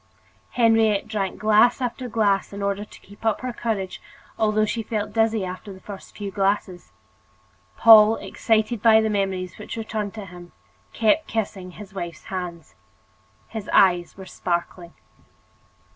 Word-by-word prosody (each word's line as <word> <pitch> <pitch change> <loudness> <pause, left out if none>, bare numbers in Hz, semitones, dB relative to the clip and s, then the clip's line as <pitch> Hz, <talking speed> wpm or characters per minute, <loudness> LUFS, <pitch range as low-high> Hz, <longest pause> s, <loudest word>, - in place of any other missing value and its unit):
Henriette 225 -4 +3
drank 200 -4 -3
glass 215 +4 +4
after 250 0 -4
glass 205 -3 +1
in 200 0 -6
order 200 +1 -1
to 210 - -14
keep 205 +3 -17
up 220 -1 0
her 255 -1 -4
courage, 210 -6 -3 0.3
although 215 0 +2
she 225 +2 -2
felt 215 -1 -4
dizzy 225 -3 +1
after 185 +3 -7
the 190 - -11
first 200 0 -11
few 200 -2 -5
glasses. 195 -2 -1 0.9
Paul, 220 -1 +8
excited 220 0 -1
by 220 -1 +6
the 220 -1 0
memories 190 -3 -2
which - - -7
returned 220 -2 -4
to 215 -2 -7
him, 175 -1 -13 0.4
kept 230 +8 +2
kissing 195 -4 -3
his 205 0 -11
wife's 175 -3 -6
hands. 170 -9 -6 0.7
His 220 -3 -7
eyes 175 -2 +3
were 190 - -9
sparkling. 175 -1 -4
210 Hz, 145 wpm, -23 LUFS, 190-220 Hz, 0.9 s, Paul